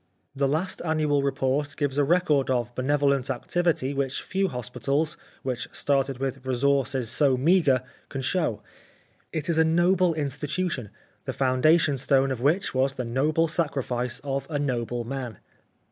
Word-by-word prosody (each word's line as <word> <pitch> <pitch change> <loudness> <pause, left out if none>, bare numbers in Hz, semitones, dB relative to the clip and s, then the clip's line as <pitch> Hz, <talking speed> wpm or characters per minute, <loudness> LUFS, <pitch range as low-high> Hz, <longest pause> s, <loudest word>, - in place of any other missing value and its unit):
The 140 0 +1
last 160 +7 -1
annual 155 -3 +1
report 140 +1 -1
gives 145 -1 0
a - - +4
record 150 -3 +2
of 120 -2 0
benevolent 140 0 +1
activity 145 +1 0
which 135 -1 -2
few 195 0 0
hospitals^ 135 +4 -2 0.3
which 125 -2 -3
started 135 -2 0
with 135 0 -3
resources 130 -2 +1
so 140 -4 +3
meagre, 140 -3 +3 0.3
can 135 - -4
show. 145 - 0 0.7
It 155 -3 -3
is 165 -2 +1
a - - +6
noble 175 +1 +3
institution, 150 - -2 0.4
the - - -3
foundation 140 +2 +3
stone 135 0 +2
of 125 -3 -3
which 160 +9 +1
was 135 +1 +1
the 125 - -3
noble 150 +7 +1
sacrifice 135 -7 -2
of 135 -1 -3
a 150 - -1
noble 120 -4 -2
man. 125 -3 -5
140 Hz, 145 wpm, -26 LUFS, 130-155 Hz, 0.7 s, a